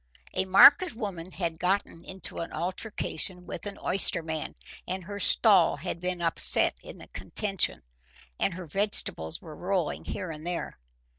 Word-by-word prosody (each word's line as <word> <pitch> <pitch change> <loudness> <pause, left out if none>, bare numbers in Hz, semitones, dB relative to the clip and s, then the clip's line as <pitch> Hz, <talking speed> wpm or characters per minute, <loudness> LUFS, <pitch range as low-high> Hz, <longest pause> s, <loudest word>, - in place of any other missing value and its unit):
A 190 - 0
market 285 - +7
woman 190 -7 -5
had 165 -4 -4
got 190 +3 +1
into 190 +2 -7
an 170 - -5
altercation 180 +1 -3
with - - -7
an 200 - -7
oysterman, 160 -4 +1 0.3
and 185 +1 -4
her 205 +3 -7
stall 200 -3 +5
had 170 +3 -5
been 180 0 -3
upset 165 - +3
in - - -11
the - - -13
contention, 195 - -2 0.6
and 180 - 0
her 185 -1 -7
vegetables 160 - 0
were 155 -2 -10
rolling 180 -2 -2
here 185 -4 -5
and 155 +1 -8
there. 175 - -4
180 Hz, 150 wpm, -28 LUFS, 165-195 Hz, 0.6 s, market